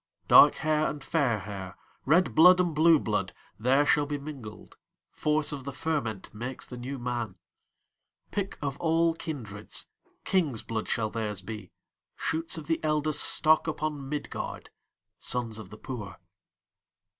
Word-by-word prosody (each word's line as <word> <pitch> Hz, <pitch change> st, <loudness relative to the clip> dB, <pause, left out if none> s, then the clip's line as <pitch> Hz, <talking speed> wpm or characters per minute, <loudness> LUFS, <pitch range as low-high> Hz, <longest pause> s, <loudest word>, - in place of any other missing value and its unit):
Dark -, -, +8 dB
hair 155 Hz, 0 st, +1 dB
and 145 Hz, -2 st, -6 dB
fair 135 Hz, -8 st, +1 dB
hair, 95 Hz, -3 st, -7 dB, 0.3 s
Red 175 Hz, +6 st, +4 dB
blood 180 Hz, +3 st, +8 dB
and 175 Hz, -3 st, +1 dB
blue 160 Hz, +2 st, +6 dB
blood, -, -, -2 dB, 0.2 s
There 130 Hz, +5 st, +3 dB
shall 145 Hz, 0 st, +3 dB
be 145 Hz, 0 st, -2 dB
mingled; 140 Hz, -7 st, -9 dB, 0.4 s
Force 150 Hz, 0 st, 0 dB
of 140 Hz, -3 st, -5 dB
the 140 Hz, -, -5 dB
fermentMakes 125 Hz, -, -3 dB
the 125 Hz, -, -8 dB
New 130 Hz, +3 st, -5 dB
Man.Pick 120 Hz, -, -7 dB
of 140 Hz, -1 st, -2 dB
all 165 Hz, 0 st, +2 dB
kindreds, 115 Hz, -11 st, -6 dB, 0.3 s
King's 155 Hz, -, +1 dB
blood 110 Hz, -1 st, -3 dB
shall 110 Hz, -2 st, -1 dB
theirs 105 Hz, -4 st, -3 dB
be, 110 Hz, +2 st, -7 dB, 0.4 s
Shoots 165 Hz, +1 st, -2 dB
of 155 Hz, -, -6 dB
the 165 Hz, +1 st, 0 dB
eldestStock 155 Hz, +1 st, +3 dB
upon 150 Hz, -3 st, -3 dB
Midgard, 150 Hz, 0 st, -5 dB, 0.5 s
Sons 115 Hz, -3 st, -2 dB
of 105 Hz, -4 st, -9 dB
the 105 Hz, -, -11 dB
poor. 110 Hz, -4 st, -7 dB
140 Hz, 135 wpm, -28 LUFS, 115-155 Hz, 0.5 s, Dark